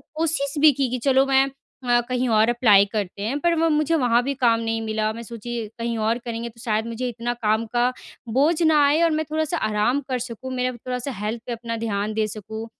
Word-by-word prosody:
कोशिश 310 -3 0
भी 310 0 +7
की 270 -2 -1
कि, 255 - -2
चलो 270 -1 +4
मैं 270 0 +4 0.4
अ, 240 -1 +3
कहीं 250 0 0
और 220 +1 +4
अप्लाई 220 -5 +5
करते 200 -2 -3
हैं 245 +8 -2
पर 345 +1 +2
वो 330 - +3
मुझे 305 +1 +2
वहाँ 245 -4 +3
भी 280 - -1
काम 230 -1 +4
नहीं 225 0 -2
मिला। 215 -1 -1
मैं 230 +1 -8
सोची 235 +1 -7 0.2
कहीं 230 0 -2
और 220 +2 +1
करेंगे 235 0 -4
तो 230 0 -20
शायद 220 -2 -1
मुझे 240 +2 -3
इतना 240 +1 -3
काम 220 -1 0
का 240 +1 +3 0.4
बोझ 305 +6 +2
ना 310 -2 +5
आए 295 +4 +3
और 330 - +3
मैं 310 0 -1
थोड़ा-सा 315 +2 -1
आराम 215 +5 +1
कर 255 - -1
सकूँ, 250 +2 -6
मेरा 255 0 0
थोड़ा-सा 250 +3 -5
हेल्थ 225 +2 -3
पे 240 - -2
अपना 230 0 -5
ध्यान 205 0 -2
दे 215 0 0
सकूँ, 220 +1 -7
240 Hz, 225 wpm, -23 LUFS, 225-275 Hz, 0.4 s, भी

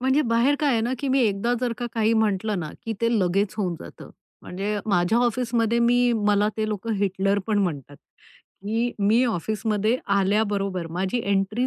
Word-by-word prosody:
म्हणजे 265 +4 +2
बाहेर 235 +3 +2
काय 295 -2 +2
आहे 230 - +2
ना, 240 +3 -1
की 280 - -3
मी 265 0 +2
एकदा 215 +1 +1
जर 245 -2 0
का 240 - -3
काही 225 -1 +2
म्हंटल 215 -1 +1
ना, 155 -3 -5
की 225 - -2
ते 230 - +2
लगेच 195 +2 0
होऊन 185 -5 -1
जात. 85 - -11 0.4
म्हणजे 205 +3 -3
माझ्या 195 +2 +2
ऑफिसमध्ये 235 -1 0
मी 245 +1 +3
मला 205 0 +3
ते 215 0 -1
लोक 210 +1 -4
हिटलर 195 0 +1
पण 215 -2 +1
म्हणतात. 145 -6 -4 0.7
की 225 +4 0
मी 215 +5 +3
ऑफिसमध्ये 215 +1 0 0.2
आल्याबरोबर 200 -2 0
माझी 185 +7 -1
एंट्री 200 +5 0
215 Hz, 175 wpm, -24 LUFS, 195-235 Hz, 0.7 s, मी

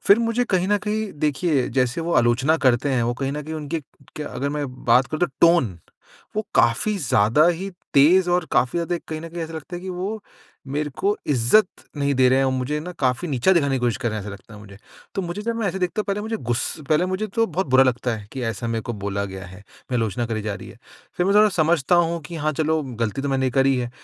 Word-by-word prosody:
फिर 200 - +7
मुझे 235 +1 +1
कहीं 185 -5 0
न 205 0 +3
कहीं 215 -1 -3
देखिए 150 -2 +1
जैसे 125 +4 +1
वो 170 +1 -2
आलोचना 120 +6 +3
करते 130 +3 +3
हैं 125 -2 +1
वो 120 +1 0
कहीं 135 +2 -3
न 150 +1 -4
कहीं 155 +2 -6
उनकी 155 +1 -3 0.4
क्य 150 - -4
अगर 140 -1 -3
मैं 150 0 -2 0.2
बात 125 +2 +5
करूँ 155 - -5
तो 175 - +4
टोन 150 - +4 0.6
वो 215 - +1
काफ़ी 120 - +3
ज़्यादा 120 - +3
ही 180 +3 -2 0.2
तेज 175 +6 +6
और 175 0 +2
काफ़ी 125 +7 +2
ज़्यादा 170 +1 -1
कहीं 155 -1 -4
न 165 - -7
कहीं 170 0 -5
ऐसा 165 0 -6
लगता 160 +3 -7
है - - -7
कि 190 - -6
वो 195 +4 -4 0.5
मेरे 150 0 -1
को 205 +1 +1
इज्ज़त 135 - +4 0.3
नहीं 140 0 +1
दे 130 -1 +4
रहे 130 - +4
हैं 135 - +3
और 130 - +1
मुझे 130 +3 -1
न 180 +4 -7
काफ़ी 130 +6 0
नीचा 140 +6 +3
दिखाने 140 -6 +2
की - - -3
कोशिश 120 -2 +1
कर 120 - -1
रहे 110 - -3
हैं - - -5
ऐसा 105 - -6
लगता 100 +2 -13
है 105 - -11
मुझे। 100 -1 -13 0.4
तो 195 - 0
मुझे 175 +3 -5
जब 230 +1 -2
मैं 225 -3 -1
ऐसे 190 - -3
देखते 185 +3 -1
हैं, - - -3
पता 200 +1 0
है - - -5
मुझे 220 +1 -2
गुस 120 - -2 0.3
पहले 155 +3 +3
मुझे 185 +3 -2
तो 225 +3 0
बहुत 185 +1 -2
बुरा 130 +1 +5
लगता 125 -1 0
है 105 -2 -10
कि 130 - -5
ऐसा 115 +2 -5
मेरे 115 -1 -2
को 120 - -4
बोला 100 0 -1
गया 95 -1 -7
है, 95 +2 -12 0.3
आलोचना 115 -1 0
करी 110 -2 -3
जा 105 -1 -3
रही - - -10
हैं। - - -14 0.4
फिर 180 - +1
मैं 200 - +2
थोड़ा 215 0 +7
समझता 165 -3 +2
हूँ 170 0 +1
कि 170 +3 -8
हाँ, 155 0 0
चलो 155 +1 0
गलती 120 -1 -3
तो 140 - -2
मैंने 135 -1 +1
करी 135 +1 +3
है। 120 -1 -2
150 Hz, 260 wpm, -23 LUFS, 120-180 Hz, 0.6 s, फिर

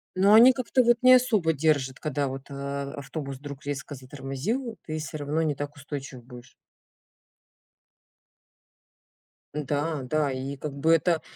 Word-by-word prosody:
Но 195 +3 +5
они 235 +4 +9
как-то 255 0 +1
вот 240 0 +4
не 255 0 +9
особо 220 -10 +3
держат, 145 -3 0
когда 145 -2 -1
вот, 135 0 -6
а, 140 0 -5
автобус 140 -1 -6
вдруг 140 +1 -9
резко 145 0 -5
затормозил, 140 - -4
ты 155 0 -4
всё 155 0 -6
равно 150 +2 -1
не 155 -3 0
так 145 +1 -6
устойчив 140 -3 -8
будешь. 125 0 -13 3.0
Н-да, 150 +1 -2
да. 145 +2 0
И 135 +2 -5
как 150 +1 -5
бы 150 +4 +2
это, 165 0 +2
145 Hz, 145 wpm, -26 LUFS, 135-165 Hz, 3.0 s, они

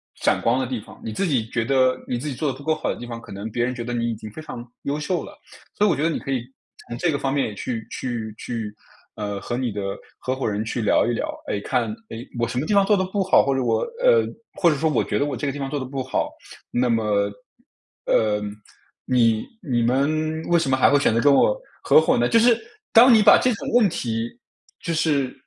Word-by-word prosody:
闪 - - +1
光 120 +2 +2
的 - - -1
地 125 -2 -3
方。 - - -14
你 110 - -4
自 185 - -1
己 125 -8 +1
觉 115 - -1
得 130 -1 +2
你 125 - -1
自 145 +5 -4
己 - - -3
做 145 +3 -1
得 130 - -4
不 140 - -12
够 160 - +2
好 155 - -4
的 - - -1
地 120 - -7
方， 115 -1 -6
可 - - -15
能 100 +3 -6
别 120 +2 0
人 125 0 -3
觉 120 - -4
得 120 +1 -4
你 120 0 0
已 115 - -2
经 110 -1 -9
非 155 - -9
常 120 -6 -8 0.2
优 140 +1 -1
秀 160 +3 -2
了。 - - -13 0.4
所 210 - +4
以 - - +4
我 - - +3
觉 145 - -3
得 165 - +3
你 - - -2
可 135 - -5
以， 130 -3 0 0.5
从 120 - -6
这 175 - +2
个 140 - -1
方 135 0 -1
面 135 -7 0
去 110 +1 -4
去 115 -4 -4
去， 110 -3 -5 0.4
呃， 105 -2 -4
和 120 +3 -3
你 125 -5 -2
的 100 - -4 0.4
合 130 - -2
伙 130 -4 -2
人 105 +1 -2
去 115 +1 -3
聊 105 - +3
一 120 - 0
聊， - - -2 0.2
哎， 100 - -1
看， 115 0 -1 0.2
哎， 115 +3 -6
我 115 - +1
什 125 - -4
么 140 - 0
地 210 - 0
方 200 -1 +5
做 210 - +4
得 185 - +1
不 200 +1 -1
好， - - +5
或 135 - +2
者 135 - 0
我 125 - +1 0.2
呃， - - +5 0.3
或 175 - +3
者 150 - +1
说 160 +2 +1
我 - - +1
觉 - - -1
得 145 - +2
我 140 -3 -3
这 135 - -4
个 140 - 0
地 145 - -7
方 135 -1 -3
做 145 - -2
得 130 - -3
不 135 0 -4
好， 130 - -1 0.4
那 125 0 +1
么， 105 -3 +1 0.8
呃， 105 -1 +2 0.7
你 115 -3 +3 0.3
你 120 -2 +2
们 155 +5 +1
为 175 - +2
什 140 -5 0
么 130 - +3
还 - - +5
会 145 - +5
选 140 - +2
择 115 - +2
跟 140 +2 +5
我， - - +3 0.2
合 465 - +6
伙 - - +2
呢？ - - +2
就 230 - +5
是， 235 0 +5 0.4
当 240 +2 +8
你 220 - +6
把 - - +7
这 250 - +3
种 - - -5
问 240 -4 +6
题， 115 -6 -2 0.5
就 170 - -1
是， 145 -5 +1
130 Hz, 285 characters per minute, -23 LUFS, 115-155 Hz, 0.8 s, 当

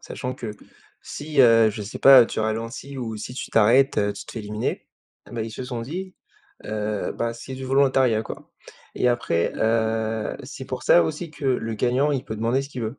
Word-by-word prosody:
sachant 125 0 -5
que 115 -4 -6 0.5
si, 150 -1 -2
heu, 115 -3 +6
je 105 - -7
sais 100 - -7
pas, 130 -4 +8
tu - - -5
ralentis 115 +5 -4
ou 115 -3 -4
si 110 +4 -7
tu - - -6
t'arrêtes, 120 +6 +4
heu, 105 0 +1
tu - - -10
te - - -9
fais 115 - -5
éliminer, 105 +1 -4 0.4
ben, 120 -2 -5
ils 115 - -5
se 125 +3 -6
sont 125 -2 -4
dit, 180 +10 -6 0.5
heu, 105 -1 -3
bah, 115 0 -1
c'est 125 +3 -8
du 130 - -7
volontariat, 130 -4 +3
quoi - - -10 0.4
et - - 0
après, 120 -9 0
heu, 110 -1 0
c'est - - -8
pour - - -5
ça 85 - +6
aussi 165 - -4
que 150 -2 -10
le 115 -3 0
gagnant, 125 +6 +1
il 135 -3 -2
peut 110 - -5
demander 115 +5 0
ce 140 - -9
qu'il 125 -4 -6
veut, 110 +5 -4
115 Hz, 210 wpm, -24 LUFS, 110-130 Hz, 0.5 s, pas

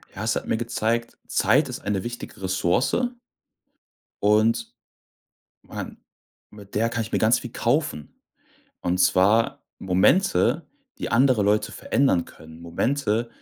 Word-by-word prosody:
Ja, 100 - -5
es 110 - 0
hat - - -4
mir 110 - 0
gezeigt, 115 0 -2
Zeit - - +2
ist - - -5
eine 100 -2 -2
wichtige 120 -4 -8
Ressource 95 +5 +1 1.3
und 110 +3 +2 0.9
man - - -8 0.5
mit 100 -2 -14
der 115 +2 +2
kann 115 -1 -2
ich 110 - -9
mir - - +2
ganz 110 +2 +3
viel 120 - -8
kaufen. 120 - -2 0.6
Und 90 +1 -1
zwar 95 +5 +3
Momente, 155 - +2 0.3
die - - -4
andere 125 -3 +4
Leute 105 +1 +1
verändern 115 -11 +1
können. 80 +1 -14
Momente, 115 +6 -1
110 Hz, 130 wpm, -24 LUFS, 95-120 Hz, 1.3 s, andere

